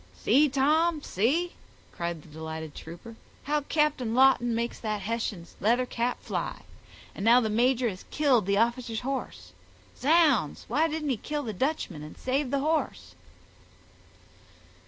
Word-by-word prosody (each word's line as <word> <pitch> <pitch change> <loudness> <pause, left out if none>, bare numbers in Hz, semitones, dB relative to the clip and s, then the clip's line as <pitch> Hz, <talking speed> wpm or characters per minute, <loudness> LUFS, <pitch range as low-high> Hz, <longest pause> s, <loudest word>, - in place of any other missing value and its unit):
"See, 285 +7 +4
Tom, 300 +4 +2
see," 300 - +1 0.4
cried 170 -3 -4
the - - -16
delighted 160 0 -7
trooper, 175 +8 -10 0.3
"how 295 +1 0
Captain 285 -6 0
Lawton 255 -3 +4
makes 235 +1 -2
that 215 -2 -3
Hessian's 210 -4 -4
leather 240 +5 +2
cap 245 0 -2
fly; - - -4 0.5
and 195 - -6
now 235 +3 +7
the 220 -3 -1
major 245 +2 +2
has 185 -4 -5
killed 260 -9 +2
the 200 0 +2
officer's 235 0 0
horse—zounds, 230 - -1
why 300 +8 +2
didn't 310 -2 -3
he 255 - 0
kill 295 +7 -4
the 220 -4 -4
Dutchman 265 - -2
and 150 +1 -10
save 265 +1 -1
the 275 +1 0
horse?" 310 +2 -1
240 Hz, 140 wpm, -28 LUFS, 200-285 Hz, 0.5 s, now